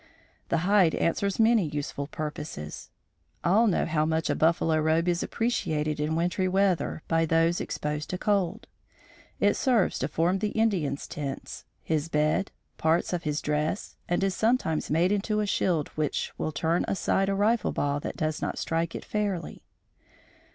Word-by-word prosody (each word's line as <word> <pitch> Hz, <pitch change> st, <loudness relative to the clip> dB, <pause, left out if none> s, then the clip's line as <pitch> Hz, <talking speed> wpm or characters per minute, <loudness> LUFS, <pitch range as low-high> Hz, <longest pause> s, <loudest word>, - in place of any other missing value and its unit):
The 170 Hz, -, +2 dB
hide 195 Hz, -4 st, +4 dB
answers 195 Hz, +4 st, 0 dB
many 225 Hz, -2 st, +5 dB
useful 145 Hz, -1 st, -4 dB
purposes. 150 Hz, -, -6 dB, 0.5 s
All 210 Hz, +7 st, +4 dB
know 195 Hz, -, +2 dB
how 155 Hz, -1 st, +1 dB
much 160 Hz, +1 st, 0 dB
a -, -, 0 dB
"buffalo 165 Hz, -1 st, +2 dB
robe" 160 Hz, +2 st, +2 dB
is 175 Hz, -1 st, +1 dB
appreciated 155 Hz, -10 st, -1 dB
in 155 Hz, +1 st, 0 dB
wintry 180 Hz, +3 st, 0 dB
weather 185 Hz, -5 st, +1 dB
by 165 Hz, 0 st, +2 dB
those 165 Hz, +2 st, +2 dB
exposed 150 Hz, +1 st, -3 dB
to 180 Hz, -, -2 dB
cold. 200 Hz, +2 st, 0 dB, 0.7 s
It -, -, +4 dB
serves 245 Hz, -8 st, +2 dB
to 130 Hz, -, 0 dB
form 170 Hz, +5 st, +1 dB
the 210 Hz, +2 st, -2 dB
Indian's 175 Hz, -11 st, 0 dB
tents, 140 Hz, -2 st, -6 dB, 0.2 s
his 160 Hz, 0 st, -1 dB
bed, 155 Hz, +5 st, +1 dB, 0.3 s
parts 160 Hz, +3 st, +1 dB
of 175 Hz, -2 st, -2 dB
his 150 Hz, +1 st, -1 dB
dress 150 Hz, +6 st, -1 dB
and 175 Hz, +2 st, +1 dB
is 195 Hz, -1 st, +1 dB
sometimes 220 Hz, -9 st, +1 dB
made 170 Hz, +5 st, +2 dB
into 210 Hz, +1 st, 0 dB
a 210 Hz, -, +1 dB
shield 175 Hz, -6 st, 0 dB
which 155 Hz, -2 st, -2 dB
will 155 Hz, -, -2 dB
turn 165 Hz, +3 st, 0 dB
aside 195 Hz, 0 st, +1 dB
a 195 Hz, -, +1 dB
rifle 215 Hz, +4 st, +2 dB
ball 145 Hz, 0 st, 0 dB
that -, -, -6 dB
does 155 Hz, -1 st, -1 dB
not -, -, -2 dB
strike 165 Hz, 0 st, -1 dB
it -, -, -6 dB
fairly. 200 Hz, -6 st, -3 dB
165 Hz, 165 wpm, -27 LUFS, 155-195 Hz, 0.7 s, many